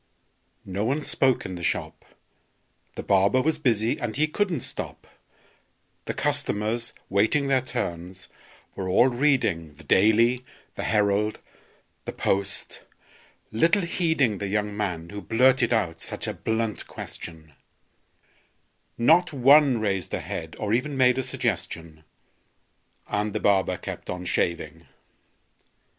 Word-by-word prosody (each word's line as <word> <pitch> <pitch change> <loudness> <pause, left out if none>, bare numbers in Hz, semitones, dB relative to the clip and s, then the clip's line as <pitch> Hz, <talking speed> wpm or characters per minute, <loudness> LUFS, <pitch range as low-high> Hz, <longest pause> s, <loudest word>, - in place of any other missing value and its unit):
No 95 +2 -3
one 140 +7 0
spoke 130 -3 +2
in 95 - -5
the 90 - -7
shop: - - -2 0.9
The - - -5
barber 100 +5 +3
was 155 +3 +1
busy, 115 -5 +1
and 115 -3 -3
he 150 - +3
couldn't 180 +2 -1
stop; - - -6 1.0
The - - -4
customers, 120 -6 0 0.2
waiting 110 +9 +2
their 135 -1 +3
turns, 90 -7 -5 0.5
were 95 -1 -4
all 120 +8 +5
reading 120 - +1
The 80 - -15
"Daily," 115 - +3 0.3
the - - -5
"Herald," 105 0 +1 0.7
the - - -4
"Post," 100 0 -2 0.7
little 165 - +3
heeding 160 - +1
The 100 - -3
young 105 +1 -1
man 90 -6 -3
who 105 0 -6
blurted 125 +2 +3
out 90 -8 0
such - - -5
a - - -3
blunt 110 -1 -2
question; 80 -2 -9 1.4
Not 165 +9 +4
one 140 -1 +5
raised 95 -5 -1
a - - -3
head, - - -6
or 105 0 -2
even 135 +4 0
made 125 0 +4
a - - +2
suggestion; 80 -9 -3 1.0
And 105 0 -1
the 110 - -1
barber 95 -3 +2
kept - - -8
on 90 0 -4
shaving. 80 -2 -2
110 Hz, 130 wpm, -25 LUFS, 95-130 Hz, 1.4 s, all